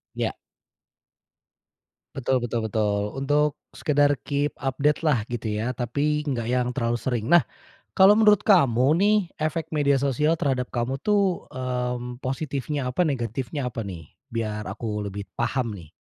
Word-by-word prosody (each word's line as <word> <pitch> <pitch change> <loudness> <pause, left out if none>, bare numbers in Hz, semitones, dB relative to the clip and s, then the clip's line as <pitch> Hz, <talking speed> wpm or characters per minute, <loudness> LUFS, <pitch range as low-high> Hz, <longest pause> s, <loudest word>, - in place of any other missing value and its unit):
Iya. - - -2 1.8
Betul 130 -1 0
betul 120 0 -2
betul. 105 -1 0 0.2
Untuk 145 +2 +2 0.2
sekedar 145 -1 +2
keep 145 +1 -1
update-lah 140 -2 +1
gitu 120 -2 -4
ya, 125 +3 -1
tapi 145 +5 0
gak 120 -4 -2
yang 125 0 +1
terlalu 120 -2 0
sering. 120 -4 -2
Nah 175 +1 +6 0.5
kalau 195 +1 +7
menurut 210 -2 +5
kamu 140 - +5
nih 205 +4 +4 0.2
efek 155 +1 -2
media 140 -2 +3
sosial 145 +4 +2
terhadap 130 -3 0
kamu 125 +3 -2
tuh, 200 -4 +1
mmm, 125 -1 -3
positifnya 135 0 -2
apa, 180 - +2
negatifnya 130 +1 -2
apa 115 -1 -4
nih? 85 -6 -8 0.2
Biar 110 -2 -3
aku 105 +1 -4
lebih 100 +1 -6
paham 120 0 -1
nih. 85 -5 -12
130 Hz, 140 wpm, -25 LUFS, 120-150 Hz, 1.8 s, kalau